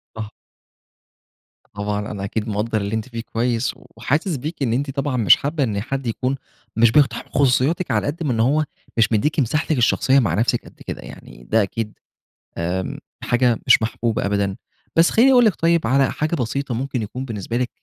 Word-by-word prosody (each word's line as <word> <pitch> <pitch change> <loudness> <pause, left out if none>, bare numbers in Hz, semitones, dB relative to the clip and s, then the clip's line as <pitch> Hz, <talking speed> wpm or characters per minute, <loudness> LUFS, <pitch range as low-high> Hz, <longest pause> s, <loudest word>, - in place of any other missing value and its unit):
صح. 110 -1 -6 1.4
طبعا 105 +1 -3
أنا 100 -2 -5
أكيد 105 +2 -3
مقدر 105 +1 -1
اللي 100 +2 -2
أنت 110 +3 -4
فيه 115 -2 -5
كويّس، 120 +1 0
وحاسس 145 - -2
بيكِ 150 +3 -4
إن 115 -3 +1
أنتِ 135 +4 -1
طبعًا 140 -1 -2
مش 105 -8 +7
حابّة 145 +1 -1
إن 105 -5 -1
حد 135 +2 -4
يكون 125 +4 -1 0.4
مش 115 0 +5
بيقتحم 130 -4 +2
خصوصياتِك 140 +6 +2
على - - +1
قد 155 +4 -3
من 145 - 0
إن 115 - -1
هو 140 +7 +3 0.3
مش 115 -2 +5
بيديكِ 115 +9 +1
مِساحتِك 150 +4 0
الشخصيّة 130 +2 +3
مع 110 -11 +1
نفسِك 115 +5 0
قد - - -16
كده، - - -5
يعني - - -12
ده 110 - +2
أكيد 105 +2 -4 0.6
آمم، 90 +3 -2 0.3
حاجة 120 -2 +2
مش - - +7
محبوبة 115 0 -1
أبدًا، 100 -1 0 0.4
بس 165 +1 +5
خلّيني 255 +4 +5
أقول 245 -2 +6
لِك 215 - +3
طيّب 165 -5 +2
على 135 +1 +3
حاجة 155 +3 -1
بسيطة 130 0 -2
ممكن 130 0 -2
يكون 125 +5 -5
بالنسبة 115 -1 -4
لِك 125 0 -1
120 Hz, 185 wpm, -21 LUFS, 110-140 Hz, 1.4 s, مش